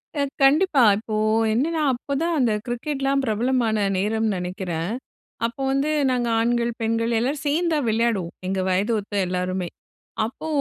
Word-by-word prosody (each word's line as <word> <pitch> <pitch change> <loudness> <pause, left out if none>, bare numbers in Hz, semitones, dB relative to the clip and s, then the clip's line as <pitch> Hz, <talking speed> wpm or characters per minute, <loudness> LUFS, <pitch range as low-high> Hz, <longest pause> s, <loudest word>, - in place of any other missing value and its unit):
அ 290 - 0 0.2
கண்டிப்பா. 290 0 +5
இப்போ 215 0 -5 0.4
என்னென்னா 310 +7 0
அப்போ 255 +3 -5
தான் 335 0 +1
அந்த 245 -4 +3
கிரிக்கெட்லாம் 275 +2 -1
பிரபலமான 230 0 +1 0.2
நேரம்ன்னு 215 +2 0
நினைக்கிறேன். 180 -1 -3 0.5
அப்போ 235 +3 -4
வந்து 275 +2 +1 0.2
நாங்க 245 -1 0
ஆண்கள் 235 +1 +1
பெண்கள் 230 +1 0
எல்லோரும் 275 +5 -1
சேர்ந்து 330 +4 +1
தான் 290 -6 0
விளையாடுவோம். 220 -6 0
எங்க 190 0 -1
வயத 195 +5 +1
ஒத்த 205 0 -11
எல்லோருமே! 180 0 -2 0.6
அப்போ 245 +7 -7
235 Hz, 140 wpm, -23 LUFS, 210-275 Hz, 0.6 s, கண்டிப்பா